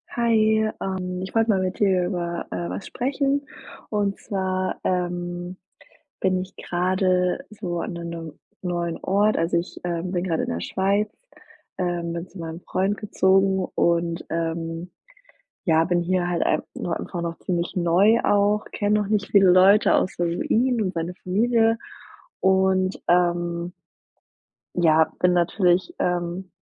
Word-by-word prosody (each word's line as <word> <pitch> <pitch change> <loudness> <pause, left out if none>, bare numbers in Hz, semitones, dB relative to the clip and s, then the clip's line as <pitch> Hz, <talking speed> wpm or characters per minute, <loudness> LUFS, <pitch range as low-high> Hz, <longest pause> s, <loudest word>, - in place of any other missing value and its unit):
Hi, 235 -1 +1 0.5
ähm, 185 -1 -3
ich 190 +3 -7
wollte 225 0 +3
mal 195 -3 +3
mit 185 -1 -2
dir 190 -3 +3
über, 175 -2 -3
äh, 85 -1 -4
was 90 +2 -5
sprechen 275 +2 -1 0.4
und 205 -2 0
zwar, 185 -1 -2
ähm, 175 0 -2 0.6
bin 185 -1 +2
ich 185 +1 -9
grade 185 +5 0
so 180 -5 -4
an 210 - -4
'ne 170 0 -6
'nem 165 -2 -6 0.3
neuen 175 -2 -2
Ort. 205 +3 +2
Also, 165 +1 +1
ich, 170 - -4
ähm, 175 0 -2
bin 175 -2 -1
grade 170 -4 -1
in - - -3
der 85 - -3
Schweiz, 200 - 0 0.7
ähm, 175 -2 -2
bin 170 +1 -5
zu 195 - -13
meinem 165 +1 -6
Freund 195 +3 -1
gezogen 190 -2 +2
und, 170 0 +1
ähm, 165 +1 -3 0.8
ja, 160 -1 +4
bin 175 +1 +1
hier 175 0 0
halt 175 -1 -1
ein 155 - +1
nur 170 - -3
einfach 175 -2 -5
noch 165 -1 -4
ziemlich 175 0 -2
neu 185 +6 +4
auch, 205 +1 +3
kenne 210 0 +1
noch 205 - -2
nicht 205 -1 0
viele 195 -2 +6
Leute 195 +4 +6
außer 175 -1 +1
nur 170 +1 -2
ihn 245 0 +2
und 185 -2 -2
seine 170 +1 -3
Familie 225 +4 +2 0.6
und, 190 0 +2
ähm 175 0 +1 1.0
ja 160 -2 +4
bin 180 0 +3
natürlich, 175 +1 +2
ähm, 175 +1 -2
180 Hz, 150 wpm, -24 LUFS, 170-195 Hz, 1.0 s, viele